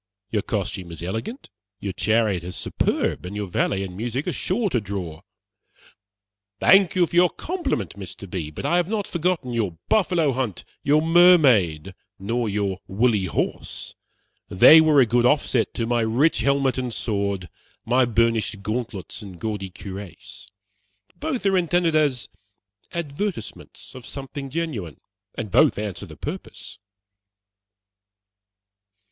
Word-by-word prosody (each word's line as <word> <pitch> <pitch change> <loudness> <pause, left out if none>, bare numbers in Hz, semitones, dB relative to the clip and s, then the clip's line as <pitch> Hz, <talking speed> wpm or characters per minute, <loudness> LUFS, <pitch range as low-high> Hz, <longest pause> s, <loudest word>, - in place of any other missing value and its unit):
Your 105 - +1
costume 95 -4 -3
is 85 0 -8
elegant, 110 - -5 0.3
your 100 -1 -4
chariot 110 -4 +1
is 90 +1 -6
superb, - - -1
and 90 +3 -7
your 105 0 -2
valet 95 +2 0
and 90 -2 -7
music 120 +7 -3
are - - +1
sure 210 +4 0
to 120 - +1
draw." 95 -6 -6 1.4
"Thank 195 -3 +5
you 180 -1 +4
for 170 - -8
your 175 0 +6
compliment, 320 - -3
Mr. 100 0 -9
B., 85 -4 -4
but 75 - -7
I 175 - +2
have 175 -1 +1
not 210 -1 -2
forgotten 170 -7 -1
your 105 -8 -1
Buffalo 175 -8 +2
hunt, 125 -7 -3 0.2
your 150 +2 +3
Mermaid, 135 - +5 0.2
nor 115 +3 -2
your 100 -2 -1
Woolly 105 -1 +1
Horse. 90 - -3 0.6
They 155 +12 +8
were 155 -3 +5
a - - +5
good 120 +2 +3
offset 130 -4 +1
to 115 - -1
my 120 +1 +1
rich 120 +9 +2
helmet 135 +1 +1
and 125 -1 -3
sword, 100 -5 -2 0.4
my 125 +3 +3
burnished 115 -3 +1
gauntlets 110 -1 -4
and 95 -4 -10
gaudy 105 -4 -3
cuirass. 100 +2 -9 0.7
Both 300 -9 -3
are 195 -1 +3
intended 175 -2 +2
as 145 -5 +1 0.6
advertisements 170 - -5
of 130 -2 -10
something 140 0 -6
genuine, 130 - -4 0.4
and - - -5
both - - +4
answer 105 -3 -5
the - - -12
purpose." - - -7
115 Hz, 140 wpm, -23 LUFS, 100-155 Hz, 1.4 s, They